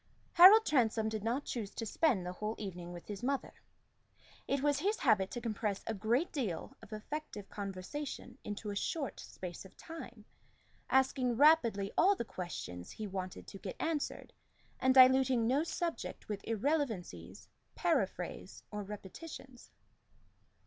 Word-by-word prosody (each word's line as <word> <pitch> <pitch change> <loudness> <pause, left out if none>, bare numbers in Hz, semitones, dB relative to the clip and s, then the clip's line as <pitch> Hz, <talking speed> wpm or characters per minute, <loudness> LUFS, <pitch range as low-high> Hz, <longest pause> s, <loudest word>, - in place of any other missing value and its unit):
Harold 400 +6 +10
Transome 225 - +2
did 215 -2 -4
not 240 +6 -1
choose 220 -5 -3
to 225 - -3
spend 220 - +2
the 180 - -3
whole 210 +4 -3
evening 180 -4 -6
with 175 -1 -9
his 205 0 -6
mother. 270 +2 -1 0.9
It 275 0 0
was 290 -1 +3
his 405 +7 +1
habit 210 -7 +3
to 240 - -5
compress 215 -3 -2
a 225 - -2
great 230 - 0
deal 220 - -3
of - - -14
effective 215 -1 -6
conversation 215 +7 -6
into 210 0 -5
a - - -5
short 280 +6 -2
space 180 -2 -8
of 190 - -16
time, 245 -10 -9 0.6
asking 260 -2 +2
rapidly 235 -10 +5
all 395 +4 +6
the 235 - -4
questions 90 - -6
he 215 - -6
wanted 185 -2 -5
to 195 - -10
get 190 - -6
answered, 320 -3 -2 0.5
and 260 0 +3
diluting 260 -2 +6
no 260 +5 +3
subject 335 0 -4
with 205 -2 -4
irrelevancies, 220 - -2 0.3
paraphrase, - - -1
or 210 - -3
repetitions. 240 - -9
230 Hz, 145 wpm, -34 LUFS, 200-280 Hz, 0.9 s, Harold